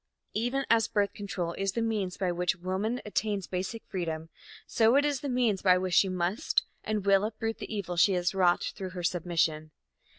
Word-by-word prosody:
Even 245 +5 -1
as 225 -1 +4
birth 200 -1 0
control 185 -4 -4
is 195 -1 0
the 230 - -1
means 210 -5 -1
by 185 -2 0
which 180 +1 0
woman 190 +7 -2
attains 205 -2 -1
basic 190 +5 -4
freedom, 165 -3 -4 0.4
so 230 +2 +3
it 285 +1 +4
is 290 -2 0
the 285 - -4
means 240 -6 +1
by 185 -2 +5
which 185 -1 -2
she 190 - +5
must 185 - 0 0.2
and 215 -2 -2
will 195 0 +4
uproot 225 +1 -3
the - - -7
evil 200 -5 -3
she 195 +3 +5
has 180 0 0
wrought 180 -2 +3
through 190 -3 -5
her 180 -1 -7
submission. 165 -2 0
195 Hz, 195 wpm, -29 LUFS, 180-220 Hz, 0.4 s, by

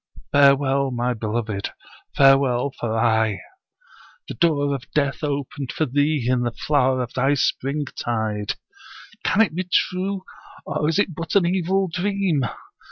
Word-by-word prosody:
Farewell, 140 -1 +4
my 125 0 -1
beloved, 110 -2 -3 0.4
farewell 135 -1 +4
for 115 -1 -2
ay. 110 -3 +2 0.9
The - - -5
door 145 -4 +1
of 135 0 -6
death 140 0 0
opened 140 -2 -3
for 155 - 0
thee 145 0 +1
in 125 -1 +2
the 120 - 0
flower 130 0 +1
of 120 - -8
thy 135 +3 +2
springtide. 120 -7 -2 0.7
Can 220 - +3
it 220 - +2
be 180 +2 -4
true, 185 +1 0 0.4
or 150 +1 -1
is 165 - 0
it 200 -4 +1
but 165 +3 -5
an 195 -3 +5
evil 190 +2 +1
dream? 185 -3 0
140 Hz, 140 wpm, -22 LUFS, 125-160 Hz, 0.9 s, an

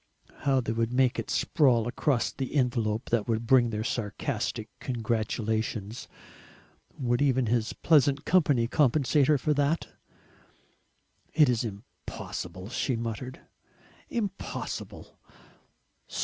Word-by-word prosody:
How 135 -2 +3
they 115 - -3
would 115 +1 0
make 125 -1 +2
it 115 - -5
sprawl 120 -6 +3
across 125 0 0
the 135 +1 -5
envelope 115 -4 0
that 115 -3 +1
would 115 0 -1
bring 120 -1 +5
their 110 -1 -3
sarcastic 115 0 -3
congratulations. 110 -2 -2 0.9
Would 120 -2 0
even 130 -3 +3
his 115 0 0
pleasant 145 -3 +3
company 145 -10 +3
compensate 145 +1 +3
her 150 - +4
for 150 +3 +1
that? 145 +3 0 1.5
"It 150 -4 +6
is 120 -1 +1
impossible," 100 -3 -7
she 125 +1 -1
muttered; 115 +3 -5 0.7
"impossible! 205 -5 -5
120 Hz, 110 wpm, -28 LUFS, 115-140 Hz, 1.5 s, It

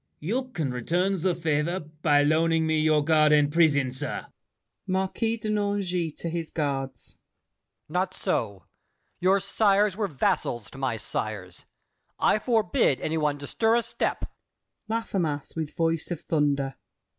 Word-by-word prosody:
You 230 - -1
can 165 - -3
return 175 +9 0
the 180 0 +1
favor 165 +2 0
By 155 -2 +1
loaning 160 +2 +2
me 160 0 +1
your 155 -1 +3
guard 155 0 +4
and 145 -1 +4
prison, 145 -6 +3
sir. 130 +1 -4 0.6
MARQUIS 195 +4 -1
DE 215 - -3
NANGIS 195 -6 -1
(to - - -5
his 165 -1 -3
Guards). 135 -4 -3 0.7
Not 185 +3 -1
so! 100 -3 -2 0.6
Your 190 +2 +4
sires 200 0 +2
were 210 -1 -1
vassals 120 - -1
to 135 - -11
my 130 -4 -1
sires. 105 - -5 0.5
I 215 - +3
forbid 215 - +2
any 160 +1 -1
one 150 -1 0
to 140 - -8
stir 225 +8 +2
a 235 - +2
step. - - -2 0.6
LAFFEMAS 185 -10 -2
(with 160 -2 -4
voice 165 -1 0
of 175 -3 -4
thunder). 140 -3 0
160 Hz, 145 wpm, -26 LUFS, 145-190 Hz, 0.7 s, guard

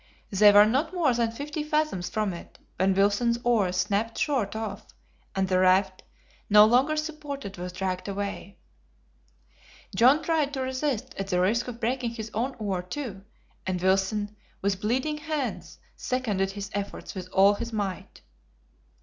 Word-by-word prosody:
They 205 +1 +7
were 205 +1 +8
not 280 +11 0
more 310 -8 +3
than 235 -1 +1
fifty 295 +6 -5
fathoms 300 - -1
from 210 -1 -1
it, 170 - -11 0.2
when 190 +1 +3
Wilson's 205 +4 +2
oar 220 -7 +2
snapped 205 +4 -1
short 250 -9 0
off, 220 -3 -4 0.5
and 190 0 +1
the 185 0 +2
raft, 185 +1 +3 0.5
no 210 0 +8
longer 255 +7 +3
supported, 290 - -5
was 180 0 -5
dragged 185 +1 -3
away. 200 0 -5 1.4
John 260 +9 +5
tried 305 -3 0
to 265 - -2
resist 260 -1 -2
at 195 - -3
the 180 -2 +1
risk 215 +7 +1
of 240 -1 -7
breaking 240 0 -1
his 220 -1 -6
own 250 +5 -2
oar, 200 -5 -2
too, 195 0 -6 0.4
and 185 -1 -1
Wilson, 195 +3 +1 0.2
with 195 -1 -1
bleeding 260 +8 0
hands, 300 -4 -4 0.2
seconded 210 -7 -1
his 200 0 -6
efforts 200 0 -5
with 185 -1 -7
all 195 +2 +5
his 235 +3 -5
might. 200 -4 -4
215 Hz, 155 wpm, -27 LUFS, 195-260 Hz, 1.4 s, were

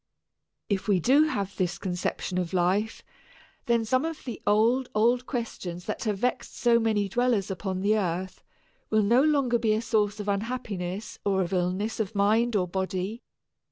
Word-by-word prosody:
If 200 -2 -1
we 200 -3 +3
do 275 - +5
have 200 -10 -3
this 180 -2 -1
conception 180 0 -2
of 180 0 -3
life, 190 +5 0 0.6
then 235 -1 +2
some 255 +5 +2
of 325 -1 -4
the 245 - -6
old, 230 +5 +3
old 240 +3 +2
questions 185 -8 -5
that - - -4
have 210 -2 0
vexed 250 +5 -2
so 235 -1 +4
many 215 -3 +1
dwellers 230 -2 +1
upon 185 0 -3
the 215 +2 +3
earth 185 0 -3 0.5
will 215 -1 +3
no 235 +5 +4
longer 275 -5 +2
be 220 -2 +2
a 215 - 0
source 210 -2 0
of 205 - -5
unhappiness 200 -2 -3
or 195 -2 +2
of 175 - -5
illness 185 +5 -1
of 220 0 -2
mind 220 +4 +2
or 185 -3 +1
body. 190 +4 -3
210 Hz, 170 wpm, -27 LUFS, 190-235 Hz, 0.6 s, do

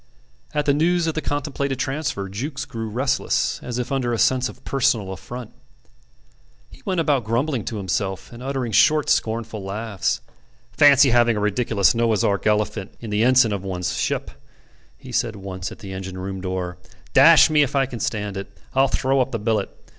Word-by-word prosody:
At 150 -1 +1
the 140 - +3
news 170 +3 +2
of 160 - 0
the 155 - -2
contemplated 140 -2 -2
transfer 135 -5 -2
Jukes 135 +9 -5
grew 115 -4 -5
restless, 130 +4 0
as 125 -1 -5
if 125 +1 -3
under 125 -3 0
a - - 0
sense 130 +2 +2
of - - -14
personal 110 -8 +1
affront. 120 +5 -9 1.2
He - - -16
went 185 -3 0
about 145 -6 +2
grumbling 120 +3 -1
to 110 - -4
himself, 95 +1 -3
and 120 - -10
uttering 130 -3 -3
short 150 +7 +4
scornful 110 -2 -1
laughs. 100 0 -2 0.5
"Fancy 140 -2 +6
having 120 -2 +3
a - - 0
ridiculous 105 -1 +2
Noah's 115 -3 +1
Ark 100 +1 0
elephant 105 -2 -1
in 115 -3 -7
the 105 +1 +2
ensign 125 -3 +4
of 100 -2 -4
one's 90 -2 -3
ship," - - -2 0.7
he 130 -2 -11
said 115 -2 0
once 95 -2 -6
at - - -10
the 95 -2 -8
engine 95 -1 -6
room 95 0 -5
door. 90 -1 -4 0.3
"Dash - - +7
me 150 -1 +4
if 140 -1 0
I 135 -1 +3
can 125 -3 -7
stand 105 -2 -3
it: 95 - -6 0.2
I'll 135 +1 +4
throw 135 +1 +1
up 130 - 0
the 115 - -1
billet. 105 -2 -1
115 Hz, 185 wpm, -22 LUFS, 100-135 Hz, 1.2 s, Dash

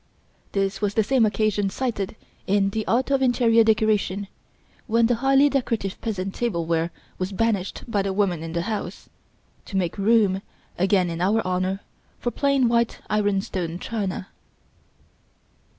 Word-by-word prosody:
This 195 0 -1
was 205 -1 0
the 220 - +4
same 230 +1 +3
occasion 210 -2 +1
cited 220 -2 -3 0.3
in 195 0 +2
The 220 +1 -3
Art 255 +4 +1
of 275 -1 +3
Interior 240 -3 +4
Decoration, 215 -3 +1 0.6
when 230 0 +3
the 245 - +3
highly 270 +1 +5
decorative 235 -8 -1
peasant 195 -4 -3
tableware 170 -7 -1 0.3
was 185 +1 -2
banished 200 -2 -1
by 210 -4 +1
the 195 0 -1
women 190 -4 0
in 165 0 -6
the 170 0 -1
house, 215 +1 -5 0.6
to 195 - -4
make 180 +1 -1
room, 200 -2 +3 0.4
again 185 -1 +2
in 165 +1 -4
our 210 +5 +2
honour, 185 +2 -1 0.4
for 240 - -2
plain 275 -2 +2
white 235 0 +1
ironstone 195 -5 0
china. 195 -3 -4
205 Hz, 145 wpm, -24 LUFS, 190-230 Hz, 0.6 s, highly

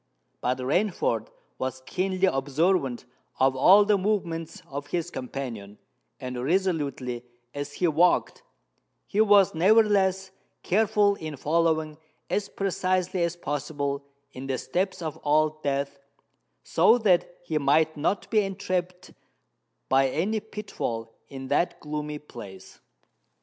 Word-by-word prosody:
But 125 +1 0
Rainford 180 - 0 0.3
was 130 0 -4
keenly 185 +3 0
observant 140 -2 +1 0.3
of 130 0 +3
all 195 +10 +7
the 205 -1 +3
movements 170 -5 -2
of 140 +1 -6
his 170 +1 -2
companion; 120 -6 -6 0.4
and, 125 -2 -5
resolutely 140 -8 -1 0.3
as 145 0 -5
he 180 - +1
walked, 170 +3 +2 0.6
he 210 - +1
was 205 -3 +5
nevertheless 190 0 +3 0.3
careful 210 +1 +3
in 155 -2 -6
following 160 0 0 0.3
as 205 -1 -1
precisely 185 -1 -1
as 170 0 0
possible 145 -2 -3 0.3
in 130 +1 -8
the 135 -1 -1
steps 185 +3 -2
of 155 -3 -5
Old 155 +1 +2
Death, 140 0 -2 0.6
so 240 - +4
that 190 -7 +2
he 160 -3 -1
might 155 +3 +3
not 155 +7 -1
be 215 -2 +4
entrapped 185 -2 -3 0.8
by 135 0 +3
any 195 +11 0
pitfall 160 - -5 0.2
in 135 -1 -7
that 175 - +1
gloomy 150 0 -4
place. 100 -10 -12
160 Hz, 120 wpm, -26 LUFS, 140-190 Hz, 0.8 s, all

